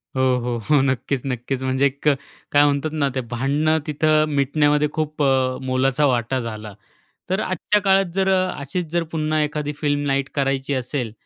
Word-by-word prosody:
हो. 125 -2 +1
हो. 150 -3 +5
नक्कीचं 135 0 -1
नक्कीचं 125 +2 -3
म्हणजे 130 +1 +1
एक 140 +2 -2 0.4
काय 145 0 +5
म्हणतात 145 +2 0
ना 145 -3 +1
ते 130 - 0
भांडणं 145 +6 +1
तिथं 155 +1 +2
मिटण्यामध्ये 145 +2 +2
खूप 155 -1 -2
अ, 130 -1 +2
मोलाचा 130 +2 +1
वाटा 125 0 +1
झाला. 110 -3 -6 0.6
तर 190 - +1
आजच्या 185 +3 0
काळात 195 -1 +4
जर 195 0 +2
अशीच 180 -3 -1
जर 170 -1 +1
पुन्हा 155 -1 0
एखादी 150 0 -3
फिल्म 145 -1 0
नाईट 140 0 0
करायची 135 0 0
असेल 125 -2 -3
140 Hz, 160 wpm, -22 LUFS, 130-155 Hz, 0.6 s, हो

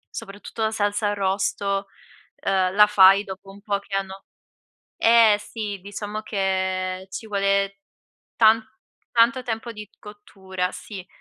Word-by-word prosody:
Soprattutto 205 +3 -8
la 220 - +1
salsa 205 0 0
arrosto, 195 0 -1 0.6
uhm, 190 -1 +1
la 210 +1 +6
fai 200 0 +6
dopo 190 0 -9
un 200 +1 -15
po' 200 -1 -1
che 200 0 -7
hanno 195 0 -6 0.8
eh, 225 -2 +6
sì! 210 -2 -6
Diciamo 205 +2 -6
che 190 -2 -2
ci 220 - -7
vuole 200 -1 0 0.6
tan 220 0 +5 0.5
tanto 240 +3 +3
tempo 235 -1 -4
di 210 -1 -9
cottura, 190 -3 -6
sì. 190 -4 -9
200 Hz, 130 wpm, -23 LUFS, 195-210 Hz, 0.8 s, la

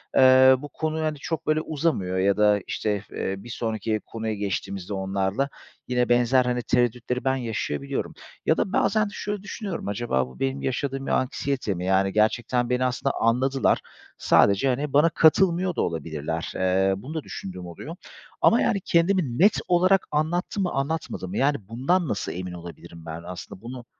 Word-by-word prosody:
eee, 130 0 +7
bu 145 - -8
konu, 155 +2 -3
hani, 155 -1 -1
çok, 160 +2 -4
böyle, 155 0 +2
uzamıyor 140 - -1
ya 100 +2 +2
da, 105 -1 +4
işte, 105 -2 -2
eee, 95 - -3
bir 110 +5 -11
sonraki 110 -2 -2
konuya 110 -1 -4
geçtiğimizde 100 -1 -4
onlarla 95 +7 -1 0.4
yine 125 -1 +1
benzer, 125 +1 +4
hani, 125 0 0
tereddütleri 125 0 0
ben 135 0 +2
yaşayabiliyorum 105 - -3 0.3
ya - - +3
da 190 - -1
bazen 215 +1 +2
şöyle 205 -1 -4
düşünüyorum, 205 - -5
acaba 100 - -1
bu 65 - -15
benim 135 +1 -1
yaşadığım 135 +1 -2
bir - - -2
anksiyete 130 -4 -1
mi? 90 0 -5
Yani 95 0 +2
gerçekten 120 +3 +1
beni 125 +1 +1
aslında 125 +2 -1
anladılar. 130 +4 +2 0.4
Sadece, 100 +7 +4
hani, 135 +3 -1
bana 150 +4 +5
katılmıyor 175 +2 +3
da - - 0
olabilirler. 80 0 -3
Eee, 95 +1 +2
bunu 130 +11 -8
da 160 - -3
düşündüğüm 90 -2 -7
oluyor 115 - -8 0.5
ama 235 - +5
yani 200 -4 +1
kendimi 170 -7 +2
net 200 +4 +5
olarak 185 +2 +3
anlattım 175 +6 0
mı 180 - -1
anlatmadım 135 - -3
mı? 95 - -4
Yani 140 +2 +2
bundan 140 - 0
nasıl 105 -4 -2
emin 90 0 -5
olabilirim 85 -1 -10
ben? 80 +1 -7
Aslında 90 +1 -8
bunu 120 +1 -8
125 Hz, 170 wpm, -25 LUFS, 95-150 Hz, 0.5 s, eee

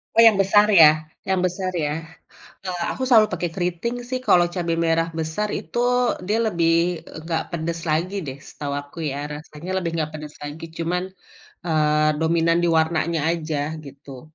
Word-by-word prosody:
Oh 230 - +7
yang 215 -3 +5
besar 205 +2 +5
ya? 175 -7 +8 0.4
Yang 190 -1 +1
besar 185 +1 -3
ya? - - 0 0.8
Eee, 180 -2 -3
aku - - -4
selalu 225 -4 +6
pake 175 -1 -1
keriting 180 +6 -2
sih, 255 - 0
kalo 175 - +6
cabe 170 -2 -1
merah 165 0 +2
besar 160 +7 -2
itu 165 +9 -6 0.5
dia 210 +3 +1
lebih 170 -5 +1 0.6
gak 160 -1 +1
pedes 165 0 -3
lagi 170 +5 0
deh 135 0 -6
setahu 140 -1 -5
aku 145 +3 -15
ya, 135 - -4 0.2
rasanya 150 +3 -9
lebih 170 -2 -2
gak 155 0 -2
pedes 150 -1 -8
lagi, 145 +3 -7
cuman, 175 +2 -1 0.6
eee, 155 -1 +2
dominan 165 +1 +2
di - - +3
warnanya 160 +1 +1
aja 160 -2 -3 0.3
gitu. 135 -1 -11
165 Hz, 165 wpm, -23 LUFS, 155-185 Hz, 0.8 s, ya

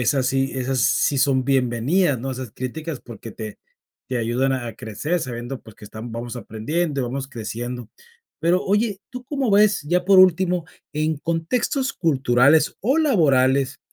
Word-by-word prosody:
esa 130 +2 +2
sí 135 +1 +1
esas 130 -1 -1
sí 140 +5 +2
son 130 -2 +2
bienvenidas, 135 +4 +2
¿no?, 135 +2 -4
esas 130 -3 -6
críticas 150 +6 -5
porque 115 -1 -10
te 110 -1 -7 0.5
te 130 - -2
ayudan 120 +4 0
a 120 -4 -4
crecer 150 - -3
sabiendo, 120 +1 -5
pues, 110 - -15
que - - -13
están 110 +3 -8
vamos 120 +1 -5
aprendiendo, 140 +6 -2
vamos 135 +2 -4
creciendo. 120 0 -6 0.5
Pero 175 +3 +3
oye, 205 0 +1
¿tú 250 0 -8
cómo 275 -3 -2
ves?, 210 -4 +4
ya 175 +4 0
por 195 0 +6
último 180 -1 +4 0.3
en 155 0 -1
contextos 170 - -1
culturales 140 -2 +3
o 265 +10 +2
laborales 140 - +3
135 Hz, 155 wpm, -22 LUFS, 120-175 Hz, 0.5 s, por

